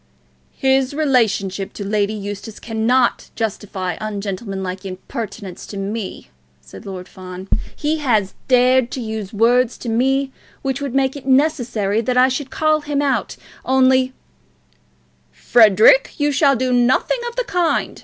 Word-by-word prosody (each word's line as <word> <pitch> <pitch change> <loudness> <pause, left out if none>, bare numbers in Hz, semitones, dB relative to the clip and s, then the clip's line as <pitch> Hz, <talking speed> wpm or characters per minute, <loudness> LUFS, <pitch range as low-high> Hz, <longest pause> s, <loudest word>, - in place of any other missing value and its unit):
"His 265 0 +1
relationship 220 -10 0
to 200 - -6
Lady 205 +1 0
Eustace 205 +1 -7
cannot 235 +2 +1
justify 200 -4 -3
ungentlemanlike 195 -2 -4
impertinence 195 0 -7
to 200 - -7
me," 200 +1 -5 0.3
said 65 - -13
Lord 185 -1 -7
Fawn. 185 0 -9 0.3
"He 305 +1 -1
has 220 -10 +1
dared 255 -1 +4
to - - -3
use 220 -4 -5
words 235 +3 +2
to 240 - -6
me 265 +4 +1 0.3
which 270 0 -2
would 275 -2 -4
make 270 0 +1
it 275 -2 -9
necessary 245 -7 +1
that 250 +2 -1
I 255 +1 +6
should 265 +1 -3
call 310 0 +1
him 290 -1 -2
out, 285 -2 -1 0.3
only 260 0 +3 0.6
" - - -39 0.2
"Frederic, 225 - +6
you 290 0 +1
shall 280 -1 +3
do 255 +1 0
nothing 245 - +2
of 475 - -14
the - - 0
kind!" 355 -7 -1
240 Hz, 145 wpm, -19 LUFS, 205-270 Hz, 0.6 s, I